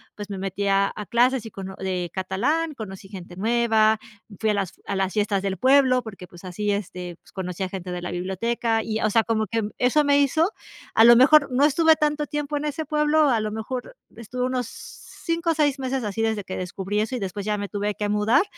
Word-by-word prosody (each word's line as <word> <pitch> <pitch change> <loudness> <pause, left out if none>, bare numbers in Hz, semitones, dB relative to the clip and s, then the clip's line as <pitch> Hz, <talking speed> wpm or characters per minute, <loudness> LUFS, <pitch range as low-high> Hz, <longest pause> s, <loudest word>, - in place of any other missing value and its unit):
pues 205 -1 -8
me 200 - -5
metí 195 +1 -3
a 195 0 +3
a 210 - -6
clases 245 +1 +2
y - - -10
cono 190 -1 -7
de 180 -2 -3
catalán, 250 - -1
conocí 195 -4 -8
gente 180 -3 -9
nueva, 220 0 +3 0.4
fui 220 -1 +2
a - - +1
las 195 -2 -3
a 200 - -3
las 190 -1 0
fiestas 205 -2 +1
del 195 -1 -2
pueblo 260 +2 +4
porque 195 -5 -9
pues 175 +1 -15
así 205 +3 -3
este 180 -3 -4
pues - - -22
conocí 185 -1 -4
a 190 - -3
gente 185 -1 -6
de 180 0 -4
la 180 - -4
biblioteca 225 +6 -1
y 220 0 -2
o 215 - +2
sea, 225 +2 +3
como 220 -1 0
que 225 +3 -1 0.2
eso 255 +5 +3
me 285 0 +4
hizo 315 +6 +2 0.4
a 225 - +7
lo 235 0 +9
mejor 280 +3 +6
no 265 +3 +4
estuve 320 +2 +5
tanto 300 0 0
tiempo 295 0 -3
en 290 - -3
ese 300 +1 -3
pueblo, 300 0 +3
a 235 -4 +2
lo 215 0 -3
mejor 245 - -5 0.2
estuve 240 +2 -4
unos 255 -2 -1
5 335 +6 -4
o - - +2
6 290 -3 +1
meses 260 -1 -2
así 210 +1 -3
desde 220 -2 0
que 185 - -5
descubrí 190 +3 -3
eso 220 +4 -2
y - - -3
después 195 0 -4
ya 210 0 0
me 205 -1 -4
tuve 205 0 -2
que 210 -1 -2
mudar, 210 - +3
220 Hz, 230 wpm, -24 LUFS, 195-265 Hz, 0.4 s, lo